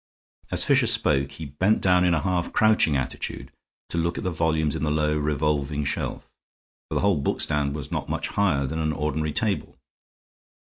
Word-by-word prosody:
As - - +3
Fisher - - +3
spoke 70 -1 +3
he 80 - -7
bent 90 +10 +1
down 90 -1 +3
in 90 -1 +3
a 80 - -2
half 90 -2 -1
crouching 110 -9 +3
attitude, 65 0 -5 0.4
to 85 - -2
look 85 +1 -1
at - - -4
the 90 - -1
volumes 80 -2 0
in - - -3
the 75 - +1
low, 75 0 +1
revolving 75 -1 -1
shelf, 70 - -4 0.6
for - - -4
the - - +1
whole 95 -7 +2
bookstand 70 0 +1
was 75 -3 -6
not - - -3
much - - -2
higher 85 -9 +1
than 80 +4 -4
an 80 -1 0
ordinary 75 +1 -2
table. 105 +4 -1
75 Hz, 185 wpm, -24 LUFS, 75-85 Hz, 0.6 s, As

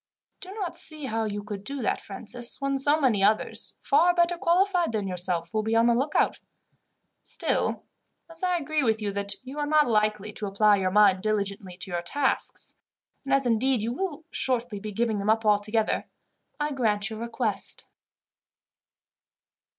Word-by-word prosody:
"I - - -8
do - - -8
not 390 -5 -4
see 310 -3 -3
how 225 -2 -1
you 205 -1 -4
could 205 -2 -7
do 275 +3 -4
that, - - 0
Francis, 235 +4 -4
when 275 0 -1
so 290 +3 +5
many 235 -9 +2
others, 215 +2 +1
far 350 +1 +4
better 345 0 +3
qualified 355 - +2
than 205 -3 -1
yourself, 175 -2 -1
will 215 - +1
be 220 +1 -1
on 230 0 +4
the 235 - +4
lookout. 270 +6 +1 0.8
Still, - - -1 0.4
as 330 0 -13
I 360 -1 +1
agree 310 -1 -1
with 220 -4 +1
you 210 -2 -2
that 200 0 -1
you 265 +3 -7
are 295 - -1
not 300 0 +4
likely 215 -2 0
to 205 - -4
apply 205 +1 +4
your 190 -1 0
mind 195 -1 +4
diligently 200 -3 -2
to 190 - -4
your 175 -1 -1
tasks, 265 +10 -2 0.5
and 275 - -5
as, 275 -1 +3
indeed, 240 0 +2
you 230 +2 -1
will 325 0 -4
shortly 245 -5 -1
be 215 +1 -6
giving 220 0 0
them 200 +2 -2
up 220 0 +2
altogether, 210 +1 +1 0.5
I 295 0 -1
grant 220 -5 0
your 220 - -6
request." 235 -2 -1
225 Hz, 175 wpm, -26 LUFS, 205-280 Hz, 0.8 s, so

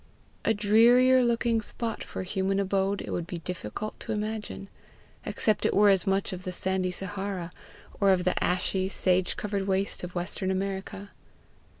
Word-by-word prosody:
A 225 - +2
drearier 240 +5 +5
looking 235 -1 +1
spot 225 +1 -4
for - - -6
human 195 +1 -1
abode 195 0 0
it - - -6
would 170 -1 -3
be 175 - -5
difficult 180 - -6
to - - -5
imagine, 210 -1 -4 0.6
except 215 -2 +1
it - - +1
were 205 0 +6
as 195 +1 +2
much 195 0 0
of 185 0 -7
the 185 - -4
sandy 185 0 +1
Sahara, 190 -1 -4 0.5
or 200 - +4
of 185 -2 +3
the 185 - 0
ashy, 185 +1 0
sage 185 -2 +1
covered 200 -2 -2
waste 195 0 -1
of 180 +1 -7
western 180 +2 -2
America. 195 +1 -3
195 Hz, 165 wpm, -28 LUFS, 185-210 Hz, 0.6 s, were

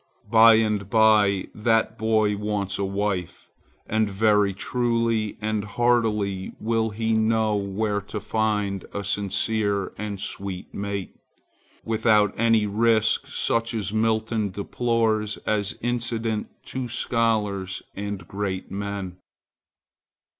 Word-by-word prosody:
By 115 0 +8
and 105 -3 0
by 105 -3 +4
that 110 0 +1
boy 110 -1 +2
wants 100 -1 -2
a - - 0
wife, 100 -2 -3 0.4
and 110 -1 +1
very 105 0 +3
truly 115 0 0
and 110 -1 -1
heartily 105 -3 0
will 110 0 0
he 110 +1 -1
know 110 -1 +2
where 100 +1 -1
to 105 +2 -6
find 105 -2 -1
a 100 - -2
sincere 100 +1 -1
and 105 -2 -4
sweet 95 -1 -5
mate, 100 -1 -4 0.7
without 110 -2 +3
any 115 -1 +3
risk 110 +1 +2
such 115 0 -1
as 105 -2 -3
Milton 110 -1 0
deplores 110 +1 0
as 105 -2 -1
incident 115 -2 -1 0.2
to 130 -1 -4
scholars 110 -5 0
and 100 -3 -5
great 95 -2 -4
men. 100 -2 -4
105 Hz, 110 wpm, -24 LUFS, 100-110 Hz, 0.7 s, By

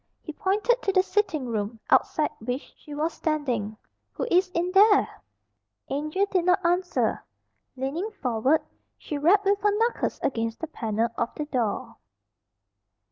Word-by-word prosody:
He 310 - -7
pointed 420 +8 +1
to 395 - +1
the 375 -1 +4
sitting 385 -9 0
room, 220 -1 -3
outside 305 -1 +3
which 250 +5 -5
she 295 - -10
was 315 +3 -1
standing. 245 -9 -2 0.4
"Who - - -3
is 365 +1 +4
in 350 +2 0
there?" 405 +2 +6 0.8
Angel 305 +8 0
did 365 -3 +1
not 360 0 +3
answer. 355 +1 +1 0.5
Leaning 280 +10 -3
forward, 270 - +1 0.3
she 295 - -5
rapped 380 +7 +4
with 400 +1 +2
her 415 - +4
knuckles 465 +2 0
against 230 -3 -1
the 325 - -3
panel 230 -6 -1
of 235 - +1
the 300 - -3
door. 240 -3 -2
310 Hz, 145 wpm, -26 LUFS, 250-380 Hz, 0.8 s, there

